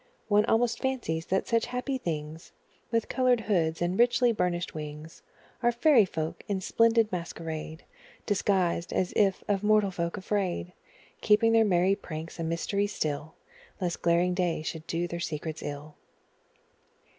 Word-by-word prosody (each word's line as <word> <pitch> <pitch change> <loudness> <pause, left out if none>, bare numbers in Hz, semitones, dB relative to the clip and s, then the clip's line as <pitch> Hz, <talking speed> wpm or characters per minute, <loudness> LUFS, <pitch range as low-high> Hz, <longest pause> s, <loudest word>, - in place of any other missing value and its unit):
One 210 0 +4
almost 235 0 +2
fancies 230 -12 -2
that 190 - 0
such 230 -1 +1
happy 250 +2 -3
things, 160 -3 -5 0.4
With 230 -2 0
coloured 255 -3 +2
hoods 170 -6 0
and 180 +4 -1
richly 240 0 +4
burnished 180 -4 -1
wings, 150 +1 -8 0.4
Are 240 -1 +3
fairy 240 -1 +5
folk, 160 -3 -4
in 200 -3 -1
splendid 230 +3 +3
masquerade 165 -2 -5 0.4
Disguised, 185 -4 +1
as 185 - 0
if 195 -3 +2
of 200 -2 +1
mortal 210 -1 +3
folk 170 +1 -3
afraid, 190 -3 -2 0.5
Keeping 225 +2 +4
their 225 0 +5
merry 185 -1 +3
pranks 165 -3 -7
a - - -2
mystery 170 +5 -1
still, 155 -5 -3 0.4
Lest 175 -3 -2
glaring 175 +1 +2
day 180 -3 -1
should 160 0 -6
do 170 +1 -1
their 170 0 -5
secrets 155 -1 -4
ill. 145 +1 -6
180 Hz, 145 wpm, -28 LUFS, 165-220 Hz, 0.5 s, fairy